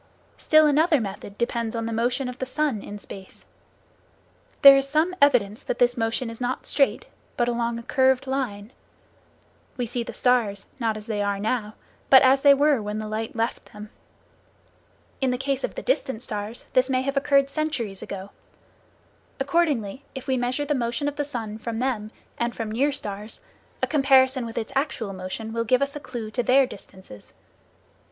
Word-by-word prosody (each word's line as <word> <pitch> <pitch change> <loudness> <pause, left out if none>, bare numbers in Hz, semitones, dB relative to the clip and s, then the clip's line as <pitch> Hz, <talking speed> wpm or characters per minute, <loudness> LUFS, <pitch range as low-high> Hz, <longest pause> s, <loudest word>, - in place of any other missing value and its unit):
Still 310 0 +4
another 305 +1 +4
method 200 -1 -6
depends 235 -1 -2
on 230 0 -2
the 230 - -3
motion 245 +4 0
of 250 0 -7
the 260 - -2
sun 275 -5 -1
in 205 - -8
space. 195 -2 -12 1.2
There 275 0 +11
is 275 0 +1
some 315 +5 +2
evidence 235 -7 +3
that - - -3
this 245 0 +3
motion 225 +1 -1
is 230 - -11
not 250 +1 -2
straight, 275 -2 +1 0.3
but 240 - +2
along 235 -1 -1
a 235 - -7
curved 265 0 +2
line. 245 -6 -3 1.1
We 245 - -1
see 240 +1 -3
the 235 - -5
stars, 225 -6 +1
not 225 -3 0
as 210 - -9
they 215 -3 -2
are 200 0 0
now, 215 0 -2 0.3
but 265 0 +8
as 265 +1 +5
they 280 0 +7
were 285 -3 +3
when 210 0 -4
the 215 0 -4
light 220 +2 -4
left 230 +1 -3
them. 210 +1 -10 1.3
In 265 - +2
the 250 - 0
case 270 0 -2
of - - -3
the - - -6
distant 265 - -1
stars 210 0 -5
this 255 +1 +3
may 260 -1 +1
have 275 +1 -2
occurred 275 0 +3
centuries 260 -11 -2
ago. 195 0 -7 1.1
Accordingly, 275 -6 0
if 265 - -7
we 265 - 0
measure 255 +3 -1
the 295 - 0
motion 245 +2 -1
of 290 - -2
the 295 - -1
sun 225 -6 -5
from 225 0 -4
them, 235 -4 -2 0.3
and 235 0 -1
from 225 -2 -4
near 275 +6 +1
stars, 210 -5 -6 0.4
a - - +6
comparison 265 -3 +3
with 225 - -9
its 230 +3 -4
actual 260 -7 -1
motion 190 +4 -6
will 230 0 0
give 255 +4 +2
us 280 +1 -3
a - - -4
clue 240 -6 -7
to 245 - 0
their 260 +3 +4
distances. 190 - -12
245 Hz, 185 wpm, -24 LUFS, 220-275 Hz, 1.3 s, There